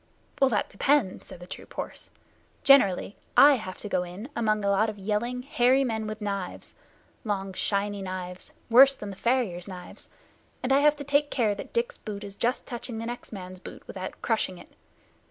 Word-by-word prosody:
"That 260 -6 +3
depends," 265 -2 +1
said - - -8
the - - -8
troop - - -9
horse. - - -6 0.5
"Generally 210 -8 +5 0.2
I 290 +1 +9
have 185 -5 -7
to - - -4
go 185 - +1
in 180 +8 -7
among 215 -3 +1
a 200 - +3
lot 210 +3 +3
of 215 - -7
yelling, 220 +5 -2
hairy 260 -1 +3
men 220 -4 -2
with 215 0 -6
knives 200 -3 -4 0.5
long 195 -3 -2
shiny 200 +1 -1
knives, 185 -1 -6 0.2
worse 265 +4 +8
than 205 -5 -7
the - - -8
farrier's 210 -6 0
knives 180 -2 -9 0.5
and 260 +1 +2
I 275 - +6
have 300 +1 +5
to 285 - -6
take 285 +1 +2
care 220 -5 +1
that 200 - -8
Dick's 475 +1 -1
boot 210 -2 -6
is 200 -1 -7
just 240 +5 -1
touching 240 -1 -5
the 225 - -4
next 240 +1 -6
man's 185 -3 -8
boot - - -11
without 185 -1 -7
crushing 220 -5 0
it. - - -14
215 Hz, 190 wpm, -27 LUFS, 195-250 Hz, 0.5 s, I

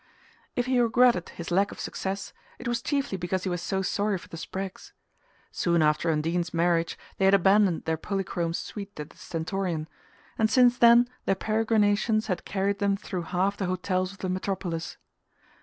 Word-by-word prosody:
If 245 - 0
he 255 -1 +2
regretted 240 -5 +3
his 170 0 -7
lack 195 +3 +2
of - - -10
success 195 +1 -4 0.2
it 245 - -7
was 240 -1 0
chiefly 275 -8 -1
because 180 +2 -2
he 190 - -1
was 175 -1 -2
so 190 +1 -1
sorry 205 +1 0
for - - -14
the - - -8
Spraggs. 190 +3 -6 0.6
Soon 170 -2 +2
after 150 +2 +2
Undine's 165 +3 -1
marriage 170 0 +1 0.2
they 195 - +3
had 195 +1 +6
abandoned 195 -2 +3
their 160 0 0
polychrome 175 -2 -2
suite 200 -2 -7
at 150 +1 -6
the - - -21
Stentorian, 170 -2 -3 0.5
and 220 -1 +3
since 245 +1 +5
then 235 0 +6 0.2
their 195 - +2
peregrinations 215 +1 +2
had 185 -5 -3
carried 200 0 -1
them 200 -1 +1
through 185 -3 -4
half 190 +3 0
the 190 - -2
hotels 185 0 -1
of 195 - -14
the 185 - -4
metropolis. 185 -3 -3
190 Hz, 175 wpm, -27 LUFS, 175-210 Hz, 0.6 s, had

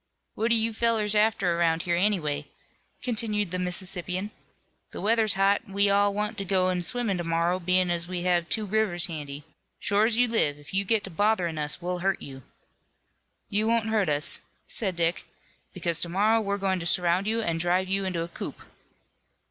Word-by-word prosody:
"What 225 +2 -1
are 235 - +4
you 225 0 +1
fellows 220 -2 +2
after 210 -5 +2
around 165 0 +1
here, 175 -1 0
anyway?" 175 -6 0 0.6
continued 210 -5 0
the 185 - -2
Mississippian. 185 +2 -1 0.6
"The - - -8
weather's 220 -1 +2
hot 195 +1 +3
an' 195 - -12
we 200 0 +3
all 200 0 +3
want 210 +2 -3
to - - -2
go 185 -1 +1
in 180 -1 -1
swimmin' 210 -1 -1
to - - -2
morrow, 170 +2 0
bein' 180 0 +1
as 170 0 -2
we 180 -1 -4
have 175 -1 +1
two 220 -2 0
rivers 200 -4 +1
handy. 145 -3 -6 0.3
Shore 205 +1 +2
as 230 -1 +1
you 245 0 +4
live 155 -11 +2
if 145 +3 -12
you 195 +1 +4
get 215 +1 +1
to 195 - -6
botherin' 180 -4 0
us 150 +3 -1
we'll 180 0 -2
hurt 190 +1 0
you." 135 -1 -10 1.1
"You 210 +2 0
won't 225 -1 +1
hurt 210 -6 +1
us," 145 0 +1 0.2
said 190 -5 -1
Dick, 170 +1 -1 0.4
"because 170 -2 -1
to 170 - +1
morrow 215 +5 +2
we're 200 -1 -2
going 190 -2 -1
to 170 - -3
surround 180 +3 +2
you 225 +1 0
and 165 -4 -1
drive 180 +2 +1
you 195 +1 0
into 180 -3 -2
a - - -6
coop." - - -7
190 Hz, 195 wpm, -26 LUFS, 175-210 Hz, 1.1 s, are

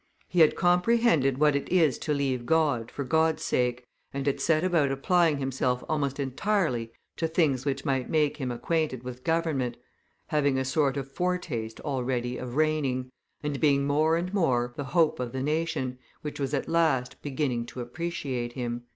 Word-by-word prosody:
"He 180 - -1
had 155 -2 +6
comprehended 180 - +3
what 150 0 +4
it 140 - -2
is 160 -8 +3
to 150 - -3
leave 135 -4 -1
God 150 -8 +2
for 140 - -4
God's 160 +3 +1
sake, 125 0 0 0.3
and 135 0 -4
had 140 - 0
set 160 0 +2
about 165 -7 +2
applying 160 +3 +2
himself 130 -2 -1
almost 145 -3 -1
entirely 135 - 0 0.3
to 165 - 0
things 150 -6 +1
which 135 -1 -2
might 135 -2 0
make 150 -2 +2
him 130 -4 -3
acquainted 130 +1 -1
with 125 0 -8
government, 160 -7 0 0.5
having 145 -4 +2
a 130 - 0
sort 140 0 +1
of 135 -1 -5
foretaste 155 -11 -2
already 125 -3 -2
of 125 -1 -6
reigning, 140 -5 0 0.3
and 145 -2 -2
being 140 -2 +3
more 155 +3 +3
and 180 +3 -3
more 125 -10 +1
the 145 - -4
hope 155 +2 +2
of 125 -2 -3
the 130 0 -2
nation, 150 -4 -1 0.2
which 150 -1 -5
was 140 +1 -1
at 135 - -2
last 155 -7 +1
beginning 130 -5 -2
to 125 - -9
appreciate 125 -3 -4
him." 120 -1 -4
140 Hz, 175 wpm, -27 LUFS, 125-160 Hz, 0.5 s, had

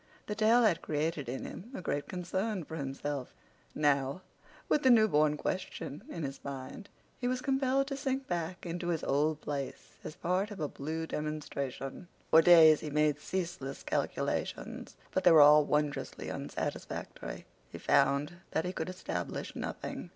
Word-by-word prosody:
The 210 - -3
tale 220 +3 +4
had 195 -7 +3
created 150 -3 -2
in 130 - -4
him 210 - -8
a - - -5
great 145 -4 -2
concern 190 +2 -2
for 160 - -7
himself. 140 -1 -4 0.4
Now, 140 +2 +1 0.4
with 300 - +3
the 260 - +4
newborn 155 -11 +5
question 145 -4 -4
in 165 - -5
his 135 -1 -5
mind, 140 +9 -7 0.3
he 245 - -1
was 255 0 0
compelled 270 0 +1
to 275 0 -4
sink 270 -1 -2
back 175 +1 -3
into 175 +1 -4
his 165 -3 -1
old 150 +2 +1
place 140 -2 -5
as 155 - -7
part 185 +5 0
of 205 -3 -8
a 150 - 0
blue 160 +4 -4
demonstration. 150 -2 -4 0.2
For 160 - +9
days 160 -2 +8
he 155 - -5
made 150 0 +2
ceaseless 170 -6 -4
calculations, - - -2 0.2
but 190 - 0
they - - +8
were 160 - +8
all 150 +1 +8
wondrously 150 -1 -1
unsatisfactory. - - -5 0.3
He - - -7
found 140 +4 +2 0.2
that 160 - +1
he 180 - -2
could - - -3
establish 185 0 -4
nothing. - - -5
160 Hz, 160 wpm, -32 LUFS, 145-190 Hz, 0.4 s, For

